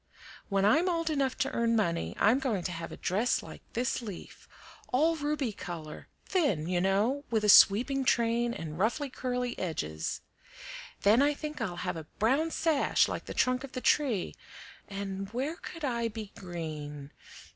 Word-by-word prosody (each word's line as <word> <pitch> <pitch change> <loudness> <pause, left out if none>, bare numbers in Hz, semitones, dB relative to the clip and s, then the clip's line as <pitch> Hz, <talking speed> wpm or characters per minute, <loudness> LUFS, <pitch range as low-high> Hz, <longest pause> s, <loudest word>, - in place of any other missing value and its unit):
When 195 -1 +2
I'm 315 - +4
old 330 -2 0
enough 275 -3 0
to 270 +1 0
earn 230 0 +1
money, 170 - 0
I'm 225 +6 +4
going 230 -9 -1
to 180 - -2
have 165 -1 -6
a - - -8
dress 210 +7 0
like - - -10
this 250 +2 -1
leaf, 205 -6 -9 0.4
all 315 +6 +3
ruby 295 -5 -1
color 160 -5 -7 0.2
thin, 215 - +1
you 175 -1 +1
know, 210 +9 +1
with 220 -2 +1
a 210 - +3
sweeping 245 +8 +7
train 235 -1 +2
and 160 -6 -6
ruffly, 245 +7 0
curly 250 -1 -2
edges; 80 - -3 0.8
then 215 +5 +5
I 290 +1 +3
think 300 -2 -6
I'll 190 -6 -2
have - - -2
a 155 -1 -8
brown 275 +9 +2
sash 320 -3 +2
like - - -4
the - - -7
trunk 255 +1 +2
of 275 - -9
the 255 - -3
tree, 250 -12 +2 0.5
and 195 -1 -5
where 280 +7 -2
could 330 -3 -6
I 235 -3 0
be 215 -2 -7
green? 150 -5 -6
230 Hz, 170 wpm, -30 LUFS, 190-270 Hz, 0.8 s, sweeping